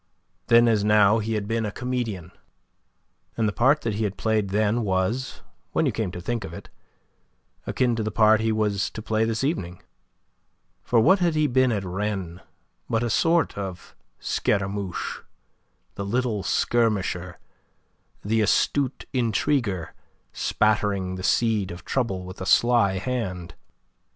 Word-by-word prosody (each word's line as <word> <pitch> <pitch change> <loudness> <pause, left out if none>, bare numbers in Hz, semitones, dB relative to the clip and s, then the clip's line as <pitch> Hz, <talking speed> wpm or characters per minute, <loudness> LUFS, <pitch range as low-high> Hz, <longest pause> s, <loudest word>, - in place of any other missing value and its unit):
Then 120 0 +6
as 110 -3 +2
now 105 +1 +4
he 110 +1 -2
had 100 -1 -3
been 115 0 -1
a 105 - -2
comedian; 115 -8 -4 1.1
and 115 -2 +1
the 105 - -1
part 135 +7 +3
that 115 - -2
he 110 +2 -2
had 105 -1 -2
played 110 -3 0
then 105 +3 +1
was, 100 +7 -1 0.3
when - - +2
you - - +2
came 110 -4 -2
to - - -6
think 115 +5 -3
of 85 -2 -7
it, - - -11 1.0
akin 125 -2 +1
to 115 - -2
the 110 - -1
part 110 0 +4
he 110 0 +1
was 105 -2 0
to 110 - -8
play 110 0 +1
this 115 +2 -2
evening. 90 - -2 1.0
For 120 - +2
what 190 - +5
had 170 -3 +1
he 155 0 +2
been 130 -2 +3
at 105 -3 -1
Rennes 95 -2 -3 0.5
but 115 +1 +1
a 120 - -1
sort 165 +4 +2
of 95 -3 -7 0.2
Scaramouche 100 -2 -2 0.7
the 100 - -5
little 110 0 -1
skirmisher, 95 -7 0 0.9
the 110 +2 +2
astute 130 +5 +1
intriguer, 115 - 0 0.4
spattering 105 -3 0
the 95 - -6
seed 105 0 +1
of 85 +1 -9
trouble 100 -8 -2
with 95 +1 -10
a 95 - -4
sly 115 -5 +4
hand? 95 -7 -4
110 Hz, 150 wpm, -24 LUFS, 95-120 Hz, 1.1 s, Then